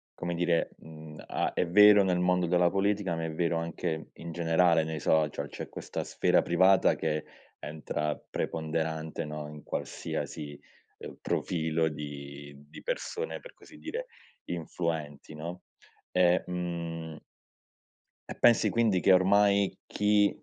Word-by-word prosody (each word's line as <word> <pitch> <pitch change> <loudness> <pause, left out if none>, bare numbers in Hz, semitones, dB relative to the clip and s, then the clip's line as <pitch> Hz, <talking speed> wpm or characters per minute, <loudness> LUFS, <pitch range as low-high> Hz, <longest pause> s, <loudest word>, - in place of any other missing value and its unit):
come 85 0 -3
dire, 85 -1 +1
mhmm, 80 -1 -11
a - - -1
è 90 - 0
vero 105 +2 +8
nel 90 -2 +1
mondo 90 0 +2
della 90 0 +4
politica, 100 -2 0
ma 80 0 -3
è 80 - -3
vero 85 +1 0
anche 85 -1 -3
in 85 0 -8
generale 85 0 +3
nei 80 -1 -4
social, 75 -1 +1
c'è - - -7
questa - - -5
sfera - - +2
privata 95 +3 +4
che 75 0 -2 0.3
entra 75 0 -3
preponderante, 80 0 -2
no, 75 0 -6
in 75 0 -11
qualsiasi, 75 -2 -5 0.4
uhm, - - -9
profilo 80 -1 0
di 70 -1 -8 0.2
di - - -11
persone, 480 -1 -3
per - - -13
così - - -16
dire, - - -5 0.4
influenti, 80 -3 -4
no? 85 +4 -7 0.5
E 90 0 +3
mhmm 85 -3 -5 1.1
E - - -5
pensi 120 -1 +5
quindi, 110 -6 +2
che 95 - +5
ormai 100 +1 +4
chi, 105 0 +3
85 Hz, 135 wpm, -29 LUFS, 80-90 Hz, 1.1 s, vero